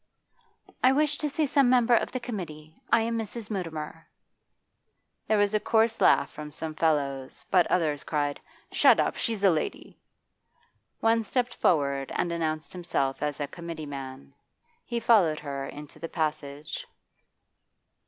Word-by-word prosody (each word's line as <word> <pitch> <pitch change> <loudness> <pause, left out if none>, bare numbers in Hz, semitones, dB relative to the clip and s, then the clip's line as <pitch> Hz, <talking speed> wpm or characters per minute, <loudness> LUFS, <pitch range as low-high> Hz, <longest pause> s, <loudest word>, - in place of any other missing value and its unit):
'I 255 +1 +6
wish 295 +1 +2
to 300 - -1
see 305 +2 0
some 275 -2 +3
member 245 -1 +4
of 235 - +2
the 255 - -3
committee. 160 -10 -7
I 230 - +5
am 230 0 -1
Mrs. 220 0 -5
Mutimer.' 165 -4 -5 1.2
There 215 - +3
was 205 0 +2
a 215 - +3
coarse 225 +1 +2
laugh - - +4
from 150 0 -8
some 155 +1 -5
fellows, 140 -4 -1
but 180 -3 +5
others 155 -5 0
cried, 145 -2 -1 0.3
'Shut - - +5
up! - - +1
she's 225 -4 -1
a 195 - +7
lady.' 155 - -3 1.0
One 225 0 +3
stepped 245 +2 -1
forward 140 -4 +1
and 175 - 0
announced 155 -3 -2
himself 165 -7 -2
as 150 -1 -2
a 145 - 0
committee 165 0 -7
man. 130 - -8 0.5
He 235 -1 -3
followed 200 -10 +4
her 140 -2 -5
into 150 0 -10
the 165 - -5
passage. 150 -2 -3
165 Hz, 150 wpm, -27 LUFS, 150-225 Hz, 1.2 s, a